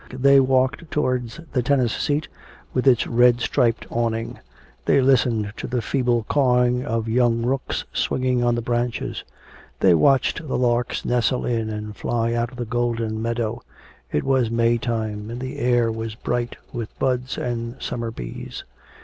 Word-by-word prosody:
They 135 +2 +5
walked 130 +4 +1
towards 130 -2 -1
the 125 - +2
tennis 125 -2 +2
seat, 150 +2 -1 0.5
with 130 +1 0
its 125 -3 +5
red 120 0 +4
striped 115 -1 +1
awning. 115 -1 -2 0.5
They - - +4
listened 120 -5 +2
to - - -5
the 120 -1 -2
feeble 120 -2 +1
cawing 125 -3 +2
of 115 -2 -2
young 115 0 +2
rooks 135 +1 -2
swinging 125 -1 0
on 120 -1 +2
the 120 - -2
branches. 120 0 -2 0.6
They 95 - +5
watched 135 - +2
the - - -1
larks 120 -1 0
nestle 125 +1 +1
in 115 -2 -1
and 105 0 -5
fly 115 +2 -1
out 120 0 0
of 125 - -12
the 120 - -3
golden 115 -2 -1
meadow. 115 0 -2 0.5
It 75 - 0
was 130 -4 +2
May 115 0 +2
time, 110 -3 -3
and 120 +1 -5
the 130 +3 -5
air 120 -3 +2
was 110 -1 -5
bright 120 +1 -2 0.2
with 115 -3 -6
buds 130 -1 -1
and 120 0 -3
summer 115 -1 -3
bees. - - -7
120 Hz, 160 wpm, -23 LUFS, 115-125 Hz, 0.6 s, They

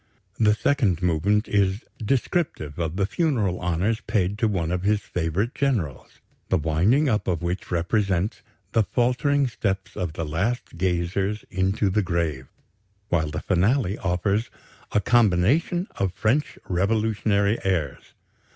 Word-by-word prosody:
The 105 -2 +4
second 110 - +1
movement 90 +5 +2
is 100 +1 +1 0.2
"descriptive 120 - -1
of 80 0 -2
the 100 0 +1
funeral 110 - 0
honors 90 +6 0
paid 100 0 0
to 110 - +3
one 85 -6 -1
of 90 0 -1
his 105 +2 +1
favorite 90 - -2
generals," 115 - -2 0.3
the - - +3
"winding 90 - +2
up" 110 -5 0
of 85 -2 -1
which 90 +2 -3
represents 95 +2 0 0.3
"the 115 - +3
faltering 125 +6 +1
steps 100 -5 -3
of 90 -4 -3
the 80 - -3
last 95 +12 -2
gazers 95 +3 -1
into 95 +1 +1
the 105 +3 +2
grave"; 85 -8 -2 0.6
while 80 -3 +1
the 75 +1 -4
finale 100 +3 +2
offers 100 +5 0 0.4
"a - - +3
combination 120 - +3
of 95 -2 0
French 110 +10 0
revolutionary 105 +2 +1
airs"! 85 -8 -2
100 Hz, 135 wpm, -24 LUFS, 90-110 Hz, 0.6 s, The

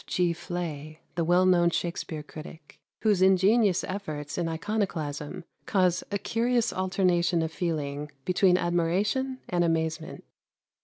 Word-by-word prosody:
Fleay, 170 -3 -2 0.2
the 170 - 0
well 175 +3 +4
known 175 -2 +5
Shakspere 170 -2 -3
critic, 155 +1 -11 0.2
whose 210 -4 +3
ingenious 190 +1 +4
efforts 155 -7 -5
in 170 -2 -1
iconoclasm 160 -6 -3 0.2
cause 185 -4 +2
a 200 - -1
curious 235 +3 0
alternation 185 -2 +1
of 160 - -3
feeling 150 -4 -3 0.2
between 180 0 +4
admiration 200 +11 0
and 175 -1 +1
amazement. 160 -1 -1
175 Hz, 115 wpm, -27 LUFS, 160-190 Hz, 0.2 s, known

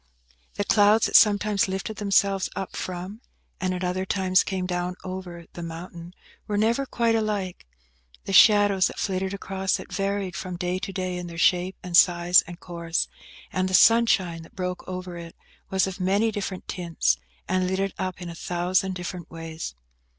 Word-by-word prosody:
The 205 - -1
clouds 210 +2 +4
that - - -1
sometimes 205 -1 +5
lifted 195 +3 -4
themselves 200 -1 +2
up 190 - -5
from, 185 +5 -6 0.4
and 185 -1 -1
at 185 0 -3
other 180 +1 -1
times 185 -1 +2
came 190 -1 -3
down 180 0 -2
over, 185 -2 -7
the 175 - -7
mountain, 170 +1 -8 0.3
were 205 - -1
never 235 +6 +1
quite 235 -2 +1
alike. 205 - -2 0.6
The 195 - -4
shadows 205 -1 +6
that - - -9
flitted 190 -1 -1
across 195 -1 -2
it - - -10
varied 195 -2 -2
from 185 -4 -5
day 180 +1 -2
to 195 - -5
day 185 -2 -3
in 180 0 -5
their 170 -1 -9
shape 180 +2 +2
and 180 -1 -3
size 175 0 +6
and 175 0 -9
course; 170 -2 -2 0.4
and 185 0 0
the 185 - +3
sunshine 195 -8 +4
that 165 - -16
broke 180 -1 -3
over 180 -1 -6
it 170 -1 -9 0.3
was 190 0 +2
of 190 0 -6
many 200 +5 +2
different 195 -3 -5
tints, 165 - 0 0.3
and 185 0 +1
lit 190 +1 -1
it 195 0 -1
up 185 -1 -3
in - - -6
a - - -6
thousand 180 +3 -1
different 180 -1 -6
ways. 165 - -7
185 Hz, 180 wpm, -25 LUFS, 175-195 Hz, 0.6 s, shadows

